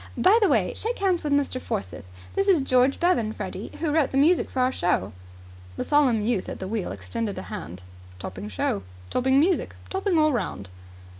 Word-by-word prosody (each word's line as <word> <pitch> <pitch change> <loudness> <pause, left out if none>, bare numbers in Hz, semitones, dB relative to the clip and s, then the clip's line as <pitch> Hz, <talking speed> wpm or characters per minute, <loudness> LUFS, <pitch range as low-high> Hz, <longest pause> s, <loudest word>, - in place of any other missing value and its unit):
By 380 +4 +5
the 410 - +4
way, - - +2
shake 465 +2 -3
hands 375 -3 +1
with 295 - -2
Mr. 285 -2 +1
Forsyth. 90 -2 -4 0.3
This 390 - 0
is 350 -8 +4
George 255 +1 +3
Bevan, 240 -12 +2
Freddie, - - -6
who 320 -3 0
wrote 305 -3 +2
the 270 - -2
music 325 +6 +4
of - - -10
our 255 0 +3
show." 175 - 0 0.6
The - - -1
solemn 275 -7 +3
youth 215 -3 -1
at - - -5
the 190 - -5
wheel 215 -1 -3
extended 225 -4 -4
a 185 - -5
hand. 90 +3 -8 0.3
"Topping 95 +2 -7
show. 100 0 -1 0.3
Topping 265 +2 +3
music. 350 +5 +1 0.2
Topping 385 -2 0
all 310 -1 +4
round." 100 - -3
260 Hz, 195 wpm, -25 LUFS, 200-325 Hz, 0.6 s, By